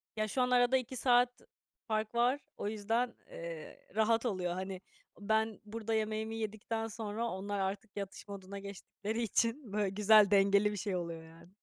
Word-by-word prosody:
Ya, 215 0 0
şu 255 +5 0
an 250 - +3
arada 245 +1 +5
2 255 +1 -4
saat 245 0 +3 0.5
fark 215 +1 -1
var. 250 +4 +3 0.2
O - - -3
yüzden, 225 +3 0 0.2
eee, 165 -2 -7 0.2
rahat 225 +2 +3
oluyor. 185 -6 0
Hani, 190 0 -4 0.4
ben 220 +1 +1
burada 225 +1 -3
yemeğimi 220 0 -1
yedikten 225 +1 -3
sonra 220 +1 -3
onlar 200 +1 -3
artık 200 +2 -3
yatış 200 +1 -6
moduna 200 0 -7
geçtikleri 200 +3 -5
için 230 +1 0
böyle 205 -2 +1
güzel, 210 +1 +6
dengeli 200 +1 +5
bir 205 - -4
şey 195 -1 -2
oluyor 170 -2 -4
yani. 165 +2 -15
215 Hz, 165 wpm, -33 LUFS, 200-225 Hz, 0.5 s, güzel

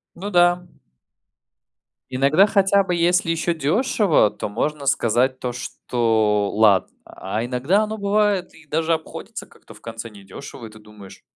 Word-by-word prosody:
Ну 195 +4 -6
да. 175 -1 +3 1.4
Иногда, 140 +9 +3
хотя 200 -1 +3
бы 180 -2 -2
если 175 0 +2
ещё 165 +1 -1
дёшево, 165 - +2
то - - -5
можно 140 +7 -3
сказать 125 +2 +1
то, 125 - -3
что 110 -4 -1
ладно. 105 -3 +3
А 105 +4 -5
иногда 130 - +1
оно 215 0 -4
бывает 200 -2 0
и 155 - -18
даже 160 +2 0
обходится 160 -1 -6
как-то - - -18
в - - -18
конце 115 0 -8
недёшево, 105 +5 -11
и - - -13
ты 110 0 -15
думаешь: 105 -2 -15
145 Hz, 150 wpm, -21 LUFS, 115-180 Hz, 1.4 s, да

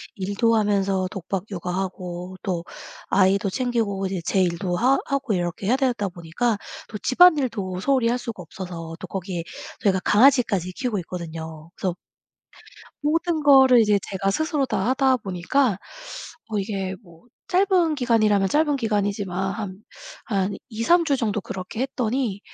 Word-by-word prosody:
일도 205 +4 +1
하면서 195 -3 +1
독박 195 -1 -4
육아 180 -1 -4
하고 180 -1 -5
또 175 -4 -2 0.4
아이도 195 +1 +3
챙기고 225 -6 -1
이제 190 -1 -3
제 190 - +2
일도 175 0 0
하 260 +6 +4
하고 275 -5 -1
이렇게 175 +2 -2
해야 245 - +4
되다 245 -7 0
보니까 180 +7 -1 0.3
또 210 - -5
집안일도 255 - +3
소홀히 260 -1 +2
할 245 - +1
수가 225 -6 -6
없어서 165 -1 -7
또 - - -6
거기에 180 -2 -4 0.4
저희가 190 -2 +2
강아지까지 220 -6 +4
키우고 240 -1 -2
있거든요. 160 -2 -7
그래서 185 -3 -2 1.1
모든 320 +1 +1
거를 265 -3 +7
이제 210 -2 +4
제가 195 0 0
스스로 300 - 0
다 215 -2 -1
하다 265 -1 +3
보니까 195 +3 0 0.8
이게 195 -2 -3
뭐 170 -4 -18 0.3
짧은 365 -4 +3
기간이라면 215 -6 +3
짧은 295 +2 +2
기간이지만 200 -5 -1
한 205 -2 -6 0.4
한 200 -3 0 0.2
2-3 280 +11 +3
주 285 -4 +2
정도 215 -4 -1
그렇게 190 +4 -6
했더니 245 -5 -1
205 Hz, 310 characters per minute, -23 LUFS, 185-255 Hz, 1.1 s, 거를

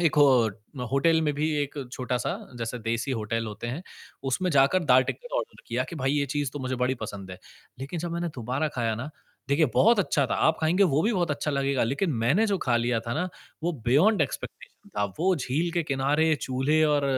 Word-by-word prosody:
एक 165 -3 +3
हो 145 -1 +7 0.5
अ, - - -2
होटल 160 +4 +3
में 150 -2 +1
भी 155 +2 0
एक 145 - -5 0.2
छोटा-सा 125 +5 -2 0.2
जैसे 115 +1 -3
देसी 115 +3 -2
होटल 115 0 -2
होते 105 +2 -6
हैं, 130 +9 -4 0.4
उसमें 180 +8 0
जाकर 145 +5 +4
दाल, 130 -1 +6
टिक्कड़ - - -4
ऑर्डर 485 +1 -6
किया - - -1
कि 170 - -6
भाई 135 0 0
ये 145 -1 +1
चीज़ 145 -1 -2
तो 145 - -5
मुझे 130 -1 -2
बड़ी 125 +1 +1
पसंद 100 -2 -8
है। 90 - -8 0.4
लेक़िन 140 +5 -4
जब 170 0 -4
मैंने 170 0 -2
दोबारा 130 +6 -1
ख़ाया 115 -4 -1
ना, 130 +8 -6 0.4
देखिए 150 +3 +3
बहुत 230 0 +5
अच्छा 150 -7 +2
था, - - -1
आप 160 - +2
ख़ाएँगे 175 +5 +3
वो 150 -4 +2
भी 225 +5 +2
बहुत 175 -5 0
अच्छा 145 +1 -1
लगेगा। 140 -3 +1
लेक़िन 140 - 0
मैंने 190 - +3
जो 200 -2 0
ख़ा 125 -7 +1
लिया 120 -1 +1
था 115 - -2
ना 180 +4 -1 0.3
वो 175 - 0
बियोंड 165 - +4
एक्सपेक्टेशन 205 - -7
था। 100 - +2
वो 185 +2 +3
झील 150 +5 -1
के 170 -1 +1
किनारे, 150 +3 +2
चूल्हे 135 +5 +1
और 150 -1 +2
145 Hz, 215 wpm, -27 LUFS, 125-170 Hz, 0.5 s, हो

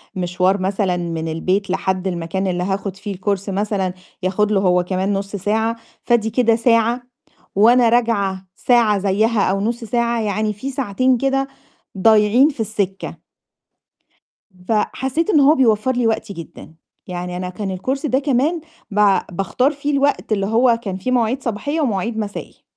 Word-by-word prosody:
مشوار 185 +1 0
مثلًا 190 -1 0
من 165 -2 -3
البيت 185 +5 -1
لحد 190 0 -1
المكان 180 +2 -2
اللي 180 -1 -1
هاخد 195 0 -3
فيه 200 0 -6
الCourse 200 +1 -2
مثلًا 195 -2 -1 0.3
ياخد 205 +3 +1
له 200 - +3
هو 180 -2 +3
كمان 190 +2 -1
نُص 200 +1 -3
ساعة، 220 +4 0 0.3
فآدي 235 -2 +2
كده 230 0 +3
ساعة، 230 +1 +2 0.5
وأنا 235 +4 +5
راجعة 200 -5 0
ساعة 235 -4 +3
زيها 205 +3 +1
أو 195 0 -1
نُص 235 +3 -2
ساعة، 235 0 0
يعني 215 0 -1
في 235 +7 -6
ساعتين 255 0 +1
كده 270 +1 0 0.5
ضايعين 220 +7 +5
في 270 - -9
السِكة. 200 -3 -3 1.5
فحسّيت 265 - 0
إن 315 - +4
هو 285 +3 +6
بيوفّر 230 -1 +2
لي 245 -2 +1
وقتي 220 -2 -2
جدًا، 170 -1 -11 0.3
يعني 180 0 -5
أنا 180 0 -4
كان 190 0 -4
الCourse 265 +9 -2
ده 265 0 +2
كمان 290 +4 0 0.3
با 205 -1 +3
باختار 195 - 0
فيه 290 0 -3
الوقت، 280 -4 0
اللي 200 -2 +1
هو 230 +2 +3
كان 190 -2 -4
فيه 255 +7 -3
مواعيد 245 +2 +1
صباحية 285 +8 -2
ومواعيد 225 -3 -1
مسائي. 210 -2 -6
210 Hz, 155 wpm, -19 LUFS, 190-240 Hz, 1.5 s, هو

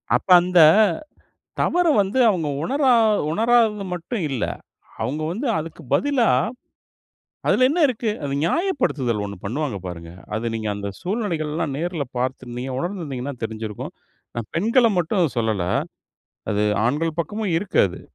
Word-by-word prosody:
அப்ப - - -2
அந்த 180 0 +2 1.0
தவற 355 0 +2
வந்து 200 +7 -1
அவங்க 170 -6 0 0.2
உணரா 270 - +2 0.4
உணராதது 220 0 +2
மட்டும் 180 +3 -4
இல்ல. 125 - -1 0.6
அவங்க 150 +4 -2
வந்து 245 +9 -3
அதுக்கு 160 +1 -7
பதிலா, 280 -5 +2 1.2
"அதுல 255 - +4
என்ன 345 - 0
இருக்கு?" 230 -3 -1
அது 140 -1 -2
ஞாயப்படுத்துதல் 170 - 0
ஒண்ணு 100 - -7
பண்ணுவாங்க 125 0 -2
பாருங்க. 85 -2 -7 0.3
அது 115 +2 -3
நீங்க 110 -1 -3
அந்த 100 0 -4
சூழ்நிலைகள்லாம் 165 - -2
நேர்ல 170 -3 -2
பாத்துருந்தீங்க 125 0 -3
உணர்ந்திருந்தீங்கன்னா 145 -6 -4
தெரிஞ்சிருக்கும். 110 -1 -5 0.4
நான் 115 -2 -5
பெண்கள 230 +8 +3
மட்டும் 170 -2 +1
சொல்லல. 110 -5 0 0.9
அது 105 0 +1 0.2
ஆண்கள் 155 +5 -1
பக்கமும் 205 -1 -2
இருக்கு 200 +2 -3
அது. 90 - -9
165 Hz, 125 wpm, -22 LUFS, -, 1.2 s, அதுல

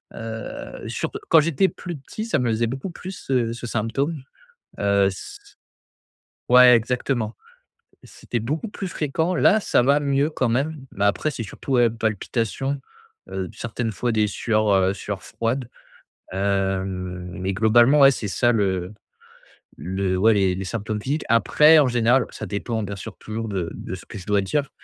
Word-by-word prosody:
Heu, 110 -1 -7
surt - - -4
quand 165 - +7
j'étais 170 +4 +2
plus 175 -2 -7
petit 215 +11 -7
ça 190 - 0
me 120 -2 0
faisait 115 +1 +1
beaucoup 135 +9 -4
plus 185 +2 -8
ce, 135 - -5
heu, 115 -2 +1
ce 120 0 -7
symptôme, 135 +7 -2 0.6
heu, 100 -1 +3
s 95 - -6
s - - -22 0.9
ouais 125 0 +8
exactement, 120 -1 -1 0.7
c'était 120 - -5
beaucoup 150 - -3
plus 195 -2 -5
fréquent 160 +5 -1
là 220 - +4
ça 120 - +2
va 140 +3 +4
mieux 140 +1 +1
quand 130 -5 0
même, 140 +3 -1
mais 100 +1 -1
après 125 +9 +1
c'est 115 - -5
surtout 120 +6 -6
ouais 120 -2 +4
palpitations, 115 +5 -2 0.5
heu, 95 -1 -3
certaines 115 -1 -3
fois 120 +5 -1
des 110 -1 +2
sueurs, 110 +1 0
heu, 95 0 +3
sueurs 100 -2 -5
froides. 120 +2 -3 0.6
Hem, 95 -2 -2
mais 95 +1 -1
globalement 120 +7 +5
ouais 135 - +8
c'est 110 -5 -4
ça 120 +5 +2
le 95 -3 0 0.8
le 95 +3 -2
ouais 110 +4 +5
les 95 -3 +2
les 95 0 -5
symptômes 105 +1 -3
physiques. 145 +6 -2
Après 150 +7 +6
en 140 - +4
général, 120 +2 +3
ça - - -7
dépend 110 +2 -3
bien 100 0 -5
sûr - - -9
toujours 110 +1 -5
de 90 -4 -2
de 95 - -6
ce 90 - -12
que - - -9
je 95 - -9
dois 105 -1 +2
dire. 140 +8 -1
115 Hz, 175 wpm, -23 LUFS, 100-135 Hz, 0.9 s, ouais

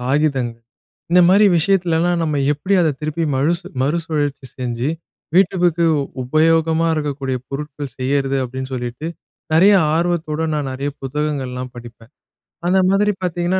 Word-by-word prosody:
காகிதங்கள் 130 -3 0 0.5
இந்த 180 +1 +6
மாரி 200 +3 +6
விஷயத்துலலாம் 175 -1 +1
நம்ம 155 -2 -1 0.2
எப்டி 185 +7 -1
அத 160 - +3
திருப்பி 155 +2 -2
மழுசு 170 +7 0 0.2
மறுசுழற்சி 150 -2 -1
செஞ்சு 125 +1 -2 0.5
வீட்டுகுக்கு 175 -3 +3 0.4
உபயோகமா 160 +4 +2
இருக்கக்கூடிய 140 -4 -2
பொருட்கள் 145 -1 -6
செய்றது." 135 +1 0
அப்படீன்னு 130 +1 -6
சொல்லீட்டு 125 +5 -5 0.5
நெறைய 195 +5 +6 0.2
ஆர்வத்தோடு 160 -2 -1
நான் 145 -3 -2
நெறைய 140 +2 -3
புத்தகங்கள்லாம் 135 -3 -3
படிப்பேன். 115 +1 -12 0.6
அந்த 190 +2 +3
மாதிரி 205 +2 +3
பார்த்தீங்கன்னா, 175 +1 0
150 Hz, 120 wpm, -19 LUFS, 130-170 Hz, 0.6 s, இந்த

